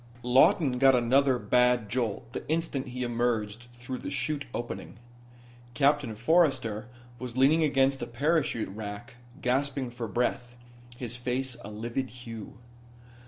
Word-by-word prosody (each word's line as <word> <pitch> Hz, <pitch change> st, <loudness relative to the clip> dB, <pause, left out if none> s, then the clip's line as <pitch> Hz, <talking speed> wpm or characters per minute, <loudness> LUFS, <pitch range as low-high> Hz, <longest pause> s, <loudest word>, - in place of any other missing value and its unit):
Lawton 125 Hz, +2 st, +4 dB
got 135 Hz, 0 st, +6 dB
another 130 Hz, +2 st, +3 dB
bad 125 Hz, -2 st, +3 dB
jolt 115 Hz, 0 st, -2 dB
the -, -, -4 dB
instant 155 Hz, -4 st, -1 dB
he 125 Hz, 0 st, -4 dB
emerged 120 Hz, -2 st, -1 dB
through 125 Hz, +1 st, -6 dB
the -, -, -5 dB
'chute 145 Hz, -2 st, -2 dB
opening. 120 Hz, 0 st, -6 dB, 0.8 s
Captain 140 Hz, -3 st, +2 dB
Forrester 120 Hz, -5 st, +2 dB, 0.3 s
was 125 Hz, -1 st, -6 dB
leaning 145 Hz, +5 st, +5 dB
against 135 Hz, -2 st, +2 dB
a -, -, -3 dB
parachute 145 Hz, -, 0 dB
rack 105 Hz, +4 st, -7 dB, 0.3 s
gasping 130 Hz, 0 st, 0 dB
for 120 Hz, -1 st, -5 dB
breath, 120 Hz, +2 st, -1 dB, 0.4 s
his 120 Hz, -1 st, -5 dB
face 125 Hz, +1 st, -2 dB
a 100 Hz, -, -7 dB
livid 120 Hz, +5 st, -3 dB
hue. 115 Hz, -4 st, -9 dB
125 Hz, 130 wpm, -28 LUFS, 120-135 Hz, 0.8 s, got